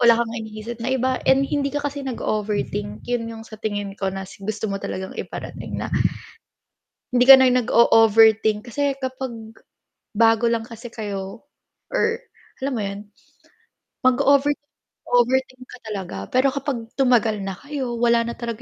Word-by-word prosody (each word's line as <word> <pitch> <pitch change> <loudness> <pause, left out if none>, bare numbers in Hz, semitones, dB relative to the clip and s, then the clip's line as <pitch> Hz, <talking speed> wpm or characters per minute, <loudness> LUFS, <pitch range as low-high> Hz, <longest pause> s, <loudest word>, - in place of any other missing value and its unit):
Wala 235 -1 +6
kang 235 -1 -1
iniisip 220 +2 -7
na 230 - -2
iba 260 0 0
and 265 +1 +5
hindi 280 0 -1
ka 290 +1 -4
kasi 285 0 -3
nag-o-overthink, 210 -5 -3
'yun 240 -2 -2
'yung 225 -1 -8
sa 220 -1 -12
tingin 205 -2 -3
ko 195 - 0
na 190 0 -5
s 190 - -14
gusto 215 +2 -3
mo 195 - -3
talagang 190 0 -5
iparating, - - -6
na - - -4 1.2
hindi 250 0 +3
ka 270 - +12
na 260 - +6
nag-o-overthink. 225 -2 +4
Kasi 285 +3 0
kapag 250 -4 -6 0.6
bago 225 +1 +4
lang 230 -1 0
kasi 230 +1 -10
kayo 205 -3 -6 0.5
or 460 +2 0 0.4
alam 275 - 0
mo 235 - -2
'yon, 200 0 -4 1.1
mag-o-over 280 +3 +4 0.6
overthink 255 +1 +1
ka 255 - -13
talaga, 190 - -5
pero 260 +1 +2
kapag 275 -4 -3
tumagal 235 -5 +2
na 195 -2 -5
kayo, 270 -4 -4
wala 235 0 +3
na 235 0 -5
talaga 235 -1 -5
235 Hz, 155 wpm, -22 LUFS, 215-260 Hz, 1.2 s, ka